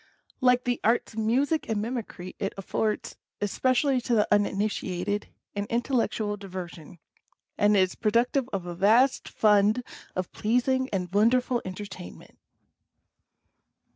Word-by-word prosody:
Like 250 Hz, -1 st, +4 dB
the 245 Hz, -1 st, -1 dB
Arts 230 Hz, +1 st, +1 dB
of 220 Hz, -, -4 dB
Music 265 Hz, +8 st, +1 dB
and 220 Hz, -2 st, 0 dB
Mimicry, 215 Hz, -5 st, -5 dB
it 195 Hz, -1 st, -2 dB
affords, 210 Hz, +2 st, -2 dB, 0.2 s
especially 255 Hz, +5 st, +1 dB
to 240 Hz, 0 st, 0 dB
the 210 Hz, -, +3 dB
uninitiated, 205 Hz, -1 st, -1 dB, 0.3 s
an 200 Hz, 0 st, -2 dB
intellectual 230 Hz, -4 st, 0 dB
diversion; 180 Hz, -4 st, -8 dB, 0.6 s
and 205 Hz, 0 st, +3 dB
is 185 Hz, -1 st, +3 dB
productive 240 Hz, +4 st, +1 dB
of 190 Hz, -3 st, -3 dB
a 175 Hz, -, -5 dB
vast 225 Hz, +9 st, +3 dB
fund 210 Hz, +2 st, +3 dB, 0.3 s
of 185 Hz, -1 st, -3 dB
pleasing 260 Hz, +4 st, +1 dB
and 185 Hz, -2 st, -3 dB
wonderful 240 Hz, +4 st, +3 dB
enter 185 Hz, +2 st, -6 dB
tainment. 185 Hz, -3 st, -11 dB
215 Hz, 125 wpm, -27 LUFS, 195-245 Hz, 0.6 s, Like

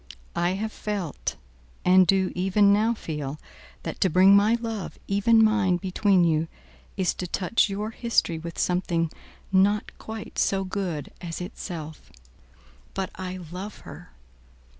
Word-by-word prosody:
I 175 Hz, +1 st, +1 dB
have 215 Hz, +3 st, -3 dB
felt, 200 Hz, -9 st, -4 dB, 0.5 s
and 185 Hz, 0 st, +6 dB
do 190 Hz, +1 st, +3 dB
even 195 Hz, +3 st, +4 dB
now 220 Hz, +3 st, +2 dB
feel, 150 Hz, -6 st, -5 dB, 0.4 s
that -, -, -6 dB
to 190 Hz, -, +4 dB
bring 185 Hz, +4 st, +6 dB
my 210 Hz, +3 st, +5 dB
love 225 Hz, -4 st, -5 dB
even 225 Hz, +3 st, +4 dB
mine 215 Hz, -5 st, +3 dB
between 190 Hz, +1 st, +2 dB
you, 160 Hz, -1 st, +2 dB, 0.5 s
is 185 Hz, -3 st, +1 dB
to 180 Hz, -, -5 dB
touch 190 Hz, +5 st, +1 dB
your 210 Hz, +3 st, -3 dB
history 225 Hz, -8 st, 0 dB
with 170 Hz, 0 st, -7 dB
something 175 Hz, -2 st, 0 dB, 0.4 s
not 200 Hz, +2 st, +2 dB
quite 220 Hz, -1 st, -7 dB
so 195 Hz, -1 st, +2 dB
good 185 Hz, -6 st, -4 dB
as 170 Hz, -2 st, -5 dB
itself. 165 Hz, -3 st, -7 dB, 0.8 s
But 190 Hz, -1 st, -2 dB
I 185 Hz, 0 st, -6 dB
love 190 Hz, +4 st, -7 dB
her. -, -, -11 dB
190 Hz, 140 wpm, -26 LUFS, 175-210 Hz, 0.8 s, and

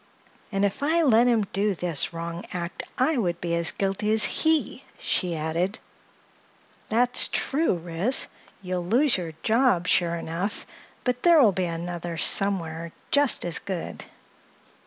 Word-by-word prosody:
"And 195 Hz, 0 st, +1 dB
if 200 Hz, +6 st, -3 dB
I 325 Hz, +4 st, +2 dB
let 240 Hz, -4 st, +4 dB
him 230 Hz, -3 st, +2 dB
do 200 Hz, 0 st, +1 dB
this 170 Hz, -4 st, 0 dB
wrong 170 Hz, +1 st, -6 dB
act 175 Hz, 0 st, -5 dB, 0.2 s
I 270 Hz, +4 st, +1 dB
would 175 Hz, -7 st, -1 dB
be 170 Hz, -1 st, -3 dB
as 170 Hz, -1 st, +2 dB
guilty 195 Hz, +2 st, -2 dB
as 220 Hz, -1 st, +5 dB
he," 320 Hz, -1 st, +1 dB
she 180 Hz, -3 st, 0 dB
added. 165 Hz, +6 st, -2 dB, 1.1 s
"That's 245 Hz, +3 st, +3 dB
true, 295 Hz, -, 0 dB
Ris. 175 Hz, +8 st, -1 dB, 0.4 s
You'll 180 Hz, -1 st, -3 dB
lose 250 Hz, +8 st, +4 dB
your 170 Hz, -3 st, -5 dB
job, 225 Hz, -6 st, +2 dB
sure 170 Hz, -1 st, +2 dB
enough, 170 Hz, +5 st, -4 dB, 0.4 s
but 250 Hz, -1 st, -1 dB
there 340 Hz, -2 st, +6 dB
will 230 Hz, -7 st, +6 dB
be 185 Hz, -1 st, -2 dB
another 170 Hz, 0 st, -5 dB
somewhere 170 Hz, -3 st, 0 dB, 0.2 s
just 285 Hz, -9 st, +2 dB
as 170 Hz, -3 st, -1 dB
good." 185 Hz, -4 st, -6 dB
190 Hz, 145 wpm, -25 LUFS, 170-240 Hz, 1.1 s, there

